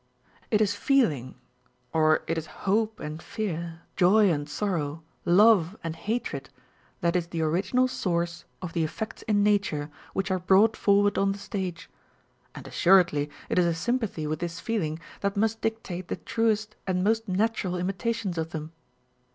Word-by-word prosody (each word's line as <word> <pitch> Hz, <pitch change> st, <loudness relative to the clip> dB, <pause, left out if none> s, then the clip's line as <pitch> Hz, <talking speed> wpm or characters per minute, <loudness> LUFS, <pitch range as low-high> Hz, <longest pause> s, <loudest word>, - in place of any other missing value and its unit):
It 215 Hz, -1 st, +3 dB
is 205 Hz, -1 st, +3 dB
feeling, 205 Hz, -, +1 dB, 0.6 s
or 155 Hz, -1 st, +3 dB
it 165 Hz, -, -1 dB
is 160 Hz, -1 st, -4 dB, 0.2 s
hope 215 Hz, +3 st, +1 dB
and 155 Hz, +1 st, -6 dB
fear, 170 Hz, -6 st, -4 dB
joy 200 Hz, +2 st, +5 dB
and 145 Hz, -2 st, -2 dB
sorrow, 160 Hz, -3 st, -2 dB, 0.2 s
love 195 Hz, 0 st, +5 dB
and 165 Hz, -1 st, -3 dB
hatred, 165 Hz, -, -3 dB, 0.5 s
that 170 Hz, 0 st, +1 dB
is 175 Hz, -2 st, +1 dB
the 165 Hz, -2 st, -2 dB
original 190 Hz, +11 st, +2 dB
source 170 Hz, -7 st, -2 dB, 0.2 s
of 175 Hz, -, -5 dB
the 165 Hz, -, +1 dB
effects 215 Hz, +8 st, -4 dB
in 205 Hz, -2 st, +2 dB
nature 195 Hz, -8 st, +1 dB, 0.2 s
which 195 Hz, 0 st, -1 dB
are 185 Hz, -, +1 dB
brought 195 Hz, +5 st, +4 dB
forward 205 Hz, 0 st, +3 dB
on 195 Hz, 0 st, +2 dB
the -, -, -8 dB
stage; 190 Hz, -4 st, -5 dB, 0.7 s
and -, -, -9 dB
assuredly 170 Hz, -6 st, +4 dB, 0.2 s
it -, -, +1 dB
is 180 Hz, -, +4 dB
a 170 Hz, -, +1 dB
sympathy 220 Hz, -4 st, -1 dB
with 155 Hz, 0 st, -2 dB
this 170 Hz, -1 st, -4 dB
feeling 175 Hz, -10 st, -2 dB, 0.2 s
that 200 Hz, 0 st, -1 dB
must 225 Hz, +1 st, +1 dB
dictate 195 Hz, -5 st, -3 dB
the -, -, -2 dB
truest 220 Hz, -1 st, 0 dB
and 180 Hz, -1 st, +1 dB
most 225 Hz, +2 st, +1 dB
natural 195 Hz, -1 st, 0 dB
imitations 195 Hz, 0 st, -2 dB
of 160 Hz, 0 st, -2 dB
them. 155 Hz, -1 st, -6 dB
185 Hz, 160 wpm, -27 LUFS, 165-215 Hz, 0.7 s, joy